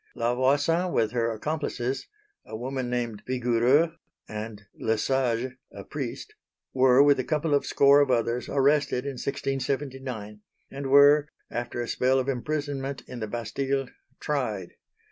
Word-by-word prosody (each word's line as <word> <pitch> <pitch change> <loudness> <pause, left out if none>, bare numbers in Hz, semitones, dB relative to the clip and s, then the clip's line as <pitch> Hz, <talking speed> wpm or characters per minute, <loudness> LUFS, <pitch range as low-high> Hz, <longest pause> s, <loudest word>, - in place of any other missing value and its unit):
La 120 +1 0
Voisin 145 +8 +2
with 110 -8 +1
her 115 -1 0
accomplices 135 0 -3 0.4
a 110 - -7
woman 130 +1 -3
named 120 -4 -2
Vigoureux 125 +6 +2 0.3
and 105 -1 -7
Le 110 0 -1
Sage, 125 0 0 0.2
a - - -9
priest - - -6 0.4
were 130 +1 +6
with 145 -2 +4
a - - +1
couple 155 +1 0
of 145 - +2
score 140 +1 +5
of 140 - +2
others 120 0 0
arrested 140 -2 +2
in 140 - -2
1679, 130 -5 -4 0.3
and 135 0 -5
were, 145 +2 +6 0.2
after 120 0 -3
a 120 - -4
spell 130 +2 +2
of 130 0 0
imprisonment 140 0 -3
in 125 - -7
the 110 - -3
Bastille, 135 +4 -2 0.3
tried. 110 -11 -2
130 Hz, 145 wpm, -27 LUFS, 120-140 Hz, 0.4 s, were